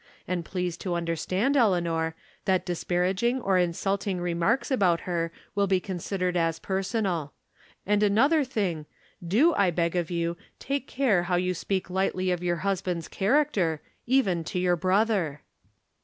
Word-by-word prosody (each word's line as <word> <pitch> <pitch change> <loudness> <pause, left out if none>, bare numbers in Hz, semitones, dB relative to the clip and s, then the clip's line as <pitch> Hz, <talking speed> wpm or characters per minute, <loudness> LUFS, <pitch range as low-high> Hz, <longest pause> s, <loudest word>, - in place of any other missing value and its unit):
And 180 -1 -1
please 180 -1 -3
to 175 0 -3
understand, 175 - 0
Elea 215 -9 +4
nor, 165 -1 -1 0.3
that 185 -1 +2
disparaging 185 +7 0
or 195 -6 +2
insvilting 195 +2 -1
remarks 175 +10 0
about 180 -9 +3
her 170 -2 -2 0.2
wlLI 200 -1 +1
be 190 -1 +3
considered 180 0 -3
as 165 -1 +1
personal. 190 -5 -2 0.5
And 205 +1 +2
another 260 +10 +4
thing 185 - -2 0.4
do, 235 - +4
I 200 -7 +3
beg 170 0 0
of 175 -2 0
you, 170 -1 -1 0.2
take 275 0 -3
care 245 -9 +2
how 180 - +3
you 180 +1 +1
speak 185 +1 -3
lightly 185 0 0
of 175 -1 -1
your 175 -1 0
husband's 180 -4 -1
character, 200 - +1 0.3
even 200 -10 +2
to 180 - -4
your 180 -1 +2
brother." 185 -4 +1
185 Hz, 150 wpm, -27 LUFS, 170-205 Hz, 0.5 s, Elea